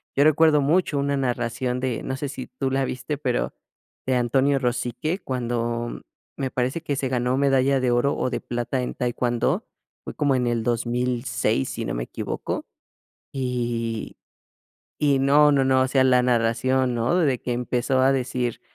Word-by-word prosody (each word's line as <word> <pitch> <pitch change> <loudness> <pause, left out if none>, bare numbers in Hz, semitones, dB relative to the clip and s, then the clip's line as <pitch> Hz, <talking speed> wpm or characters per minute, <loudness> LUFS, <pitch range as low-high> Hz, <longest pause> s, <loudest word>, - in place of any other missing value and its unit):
yo 140 - +4
recuerdo 155 -1 +5
mucho 155 +1 +2
una 140 0 0
narración 125 -1 -1
de, 125 -3 -2
no 130 - -3
sé 145 0 -4
si 130 -2 -7
tú 130 +1 -3
la 135 0 +1
viste, 130 +3 -4
pero - - -1 0.5
de 130 - +1
Antonio 135 +3 +2
Rosique, 125 - -2
cuando 120 - -3 0.4
me 130 -1 -2
parece 130 +6 -1
que 145 -4 -2
se 135 -1 -2
ganó 125 0 0
medalla 135 -1 +3
de 130 -1 +1
oro, 120 +4 +2
o, - - -1
de 125 - -2
plata 120 +2 -2
en 125 - -3
taekwondo, 120 -1 -1 0.4
fue - - -7
como 140 -2 +2
en 125 -1 +1
el 120 -1 0
2006, 120 - 0
si - - -4
no - - -3
me - - -2
equivoco. - - -4 0.7
Y 120 -4 -3 0.8
y 140 -2 +3
no, 145 +2 +5
no, 135 -2 +3
no, 130 0 +3
o 130 - +2
sea, 130 0 +3
la 125 -1 +5
narración, 125 +2 +1
¿no? 120 +8 +1
De 140 -8 +1
que 125 - -3
empezó 125 +2 0
a 135 +1 +5
decir, 125 -2 -2
130 Hz, 175 wpm, -24 LUFS, 120-135 Hz, 0.8 s, recuerdo